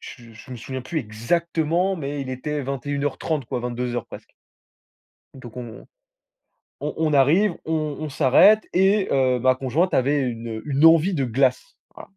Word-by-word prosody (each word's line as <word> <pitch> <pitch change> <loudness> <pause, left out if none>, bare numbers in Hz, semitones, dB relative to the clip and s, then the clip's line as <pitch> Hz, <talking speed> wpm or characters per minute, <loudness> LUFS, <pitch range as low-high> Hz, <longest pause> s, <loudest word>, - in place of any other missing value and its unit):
je 115 -2 -12
je 110 +3 -15
me 125 - -6
souviens 130 +3 -6
plus 160 +5 -3
exactement, 165 - -1
mais 145 -2 -5
il 130 - -7
était 145 +3 -4
21:30, 140 +2 -3
quoi, 120 - -4
22:00, 120 0 -4
presque - - -11 1.1
donc 125 -3 -12
on 120 -2 -9 1.0
on - - -4
on 160 -1 0
arrive, 165 +8 +3
on 155 -2 -2
on 155 - -4
s'arrête 150 +10 +4
et 195 +2 +2
heu, 130 -2 +2
ma 130 +1 +3
conjointe 135 +8 -1
avait 140 +3 +2
une, 120 -3 -4
heu, - - -10
une 145 +1 +1
envie 165 +3 +5
de 140 -5 0
glace. 135 - 0 0.2
Voilà. - - -13
140 Hz, 165 wpm, -22 LUFS, 125-160 Hz, 1.1 s, envie